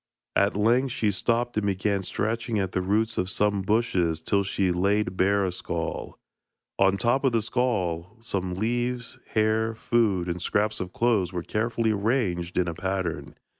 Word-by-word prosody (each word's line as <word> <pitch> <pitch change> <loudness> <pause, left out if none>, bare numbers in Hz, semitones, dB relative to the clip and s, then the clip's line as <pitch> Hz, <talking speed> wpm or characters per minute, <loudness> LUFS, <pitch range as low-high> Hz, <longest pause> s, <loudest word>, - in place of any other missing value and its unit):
At 100 0 +3
length 120 +5 +2
she 105 -2 +1
stopped 120 +4 0
and 105 -1 +1
began 100 +1 0
scratching 115 +4 -2
at 95 -2 -1
the 95 - 0
roots 110 +4 +1
of 90 - -1
some 100 0 +1
bushes 95 -6 +1
till 100 +5 +1
she 95 -1 0
laid 100 +2 +1
bare 100 +1 +2
a 90 - -1
skull. 85 -2 -4 0.6
On 95 0 +5
the - - -1
top 120 +7 +1
of 135 -3 +2
the 115 - +3
skull 105 -6 -1
some 95 -6 -3
leaves, 120 +3 -2 0.2
hair, 110 +1 +2
food, 110 -6 +1
and 90 0 -3
scraps 105 +3 0
of 90 -1 -4
clothes 110 -7 +1
were 90 -2 -3
carefully 110 +2 0
arranged 100 -5 0
in 90 - +2
a 85 - -2
pattern. 85 -5 -3
100 Hz, 170 wpm, -26 LUFS, 90-115 Hz, 0.6 s, On